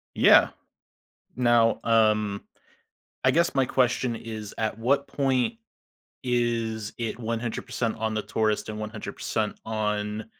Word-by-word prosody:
Yeah. -, -, +6 dB, 0.9 s
Now, 120 Hz, -2 st, +3 dB
um, 105 Hz, -3 st, +2 dB, 0.8 s
I -, -, +5 dB
guess 170 Hz, -1 st, +2 dB
my 135 Hz, -1 st, +3 dB
question 125 Hz, -1 st, +1 dB
is, 110 Hz, -2 st, -7 dB
at 110 Hz, -1 st, -2 dB
what 140 Hz, +5 st, +1 dB
point 135 Hz, -, 0 dB, 0.7 s
is 115 Hz, -3 st, -1 dB
it 115 Hz, 0 st, -4 dB
100% 115 Hz, 0 st, -3 dB
on 110 Hz, 0 st, -2 dB
the 110 Hz, -, -1 dB
tourists 110 Hz, 0 st, -1 dB
and 110 Hz, 0 st, -5 dB
100% 110 Hz, 0 st, -4 dB
on 105 Hz, -1 st, -2 dB
115 Hz, 115 wpm, -26 LUFS, 110-120 Hz, 0.9 s, Yeah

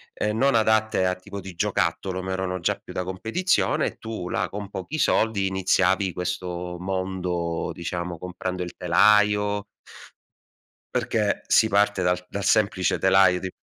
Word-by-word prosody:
uhm, 105 Hz, +1 st, -1 dB
non 135 Hz, 0 st, +3 dB
adatte 110 Hz, -3 st, +2 dB
a 90 Hz, -, +2 dB
tipo 100 Hz, +2 st, -9 dB
di 95 Hz, -1 st, -9 dB
giocattolo, 95 Hz, +2 st, -1 dB
ma 95 Hz, -, -4 dB
erano 95 Hz, -1 st, -2 dB
già -, -, 0 dB
più -, -, -10 dB
da 90 Hz, -, -2 dB
competizione. 140 Hz, -, 0 dB
Tu 110 Hz, -6 st, -6 dB
là -, -, -1 dB
con 100 Hz, 0 st, -6 dB
pochi 95 Hz, -, -5 dB
soldi 110 Hz, -8 st, +2 dB
iniziavi 95 Hz, 0 st, +1 dB
questo 90 Hz, 0 st, -4 dB
mondo, 90 Hz, -3 st, -2 dB
diciamo 85 Hz, 0 st, -4 dB
comprando 90 Hz, +1 st, -4 dB
il 90 Hz, -, -8 dB
telaio. 105 Hz, +3 st, +3 dB, 1.3 s
Perché -, -, 0 dB
si 110 Hz, -, +4 dB
parte 100 Hz, -1 st, +2 dB
dal 90 Hz, 0 st, +1 dB
dal 100 Hz, -1 st, -4 dB
semplice 100 Hz, -3 st, +2 dB
telaio 95 Hz, -1 st, +4 dB
di 95 Hz, -, -4 dB
95 Hz, 145 wpm, -24 LUFS, 90-105 Hz, 1.3 s, si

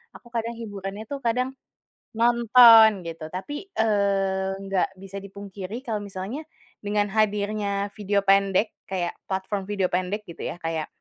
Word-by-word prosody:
aku -, -, -14 dB
kadang 230 Hz, 0 st, -2 dB
hiburannya 205 Hz, -2 st, -6 dB
itu 280 Hz, -, -3 dB
kadang 250 Hz, +3 st, 0 dB, 0.6 s
nonton 235 Hz, -1 st, +8 dB, 0.2 s
gitu. 165 Hz, -1 st, -6 dB
Tapi, 290 Hz, -, -6 dB
eee, 195 Hz, -3 st, +1 dB
nggak 195 Hz, -1 st, +1 dB
bisa 195 Hz, +1 st, -9 dB
dipungkiri 200 Hz, +2 st, -8 dB
kalau 220 Hz, -4 st, -2 dB
misalnya 200 Hz, +7 st, -5 dB, 0.4 s
dengan 205 Hz, 0 st, +1 dB
hadirnya 205 Hz, -1 st, 0 dB
video 205 Hz, -1 st, +1 dB
pendek 195 Hz, +1 st, +3 dB, 0.2 s
kayak, 180 Hz, -2 st, -2 dB, 0.2 s
platform 190 Hz, +1 st, -2 dB
video 195 Hz, -3 st, +1 dB
pendek 185 Hz, +4 st, -1 dB
gitu 170 Hz, -, -9 dB
ya -, -, -5 dB
kayak 165 Hz, -1 st, -2 dB
200 Hz, 135 wpm, -25 LUFS, 190-220 Hz, 0.6 s, nonton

